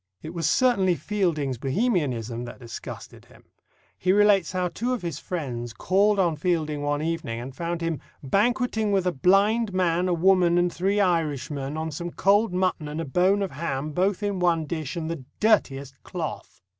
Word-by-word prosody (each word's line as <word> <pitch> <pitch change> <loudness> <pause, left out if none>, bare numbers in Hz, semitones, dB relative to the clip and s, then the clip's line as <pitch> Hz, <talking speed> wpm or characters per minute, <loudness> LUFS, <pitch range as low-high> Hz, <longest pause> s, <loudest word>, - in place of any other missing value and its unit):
It 160 - -7
was 170 -2 0
certainly 200 -9 +3
Fielding's 160 - -1
Bohemianism 130 - -1
that 120 - -9
disgusted 115 -2 -9
him. - - -20 0.6
He 185 - +2
relates 205 -3 +4
how 180 -1 -1
two 245 +8 -2
of 245 - -4
his 165 -3 -4
friends 120 -9 -4
called 200 - +2
on 170 -5 +2
Fielding 155 -3 -1
one 145 +1 -1
evening 160 -8 -3
and 130 +2 -8
found 170 +1 -3
him 165 -3 -1 0.2
"banqueting 220 - +1
with 195 -2 +2
a 180 - +2
blind 195 - +2
man, 180 -1 +2
a 180 - +1
woman, 175 0 +4
and 175 0 +2
three 195 +4 0
Irishmen, 150 -5 -1
on 160 0 -3
some 170 +3 -5
cold 200 +4 +2
mutton 180 -4 0
and 150 +2 -5
a 165 - -2
bone 185 +7 +2
of 195 - -3
ham, 145 0 -3
both 190 +5 0
in 200 -2 -1
one 170 -3 +2
dish, 155 -1 -4
and 165 -2 -3
the 165 -5 -5 0.2
dirtiest 140 - +2
cloth." - - -6
170 Hz, 180 wpm, -25 LUFS, 150-195 Hz, 0.6 s, relates